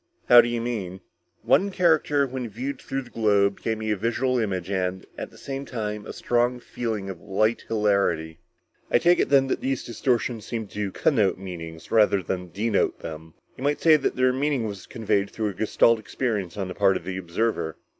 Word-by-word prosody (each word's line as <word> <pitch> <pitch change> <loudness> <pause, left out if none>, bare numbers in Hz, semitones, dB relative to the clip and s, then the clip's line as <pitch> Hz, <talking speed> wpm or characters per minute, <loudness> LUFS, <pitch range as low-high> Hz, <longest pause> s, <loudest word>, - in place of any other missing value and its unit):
"How 120 -1 +10
do - - -2
you 120 -1 -2
mean?" 100 -6 -4 0.4
"One 200 - +3
character 160 -6 +3
when 130 -2 -5
viewed 130 +6 -5
through 135 0 -3
the 120 - -16
globe 100 -3 +2
gave 110 -1 -1
me 110 0 -2
a - - +2
visual 120 +5 0
image 95 -4 -2
and, 95 -1 -2
at - - -6
the - - -18
same 135 0 -5
time, 105 -5 -5
a - - -5
strong 120 +1 0
feeling 110 -5 -4
of 95 -3 -7
light 110 +4 0
hilarity." 100 -7 +1 0.5
"I - - +4
take 175 +7 +4
it - - +1
then 135 -1 +5
that 135 - -2
these 135 -1 -1
distortions 120 -1 -1
seemed 110 -4 -5
to 105 -2 -3
connote 110 -9 +2
meanings, 85 -4 -8
rather 105 -3 +4
than 90 +1 -4
denote 110 +5 0
them. 80 0 -8 0.2
You - - -7
might 145 +1 +1
say 160 -2 +6
that 150 - 0
their 130 0 +3
meaning 135 -2 0
was 100 -3 -6
conveyed 100 -3 0
through 110 -2 -2
a - - -6
Gestalt 110 +3 +3
experience 105 -2 -3
on 95 -2 -2
the 90 - -5
part 95 0 +3
of - - -10
the 95 +1 -4
observer." 85 -2 -2
110 Hz, 200 wpm, -25 LUFS, 95-125 Hz, 0.5 s, How